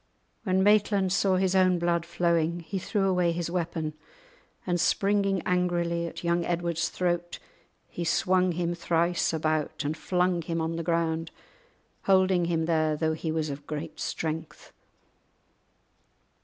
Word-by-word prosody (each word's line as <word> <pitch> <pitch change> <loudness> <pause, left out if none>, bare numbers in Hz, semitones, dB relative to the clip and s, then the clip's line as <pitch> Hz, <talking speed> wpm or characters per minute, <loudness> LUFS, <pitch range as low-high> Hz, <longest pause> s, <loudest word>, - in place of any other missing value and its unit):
When 190 -1 +2
Maitland 205 -2 +3
saw 195 -1 +2
his 185 0 +1
own 185 -1 +4
blood 170 -1 0
flowing 170 -1 +1
he 190 +4 -4
threw 195 +1 0
away 180 -2 +2
his 170 0 -3
weapon, 165 -3 -2 0.7
and 175 -2 0
springing 195 -1 +2
angrily 175 -2 0
at 170 - -8
young 170 0 +1
Edward's 170 -1 -1
throat, 175 -1 -2 0.5
he 175 - -5
swung 185 +1 +2
him 170 0 -1
thrice 170 0 +1
about 155 -2 -1
and 150 +2 -1
flung 180 +1 0
him 165 +1 -3
on 165 +1 -2
the 165 - -2
ground, 165 -1 -1 0.8
holding 185 -2 +4
him 165 -1 0
there 155 -2 +1
though 160 +1 0
he 160 0 -3
was 155 -2 -1
of 140 +1 -8
great 155 +1 -6
strength. 160 0 -5
170 Hz, 140 wpm, -27 LUFS, 165-180 Hz, 0.8 s, own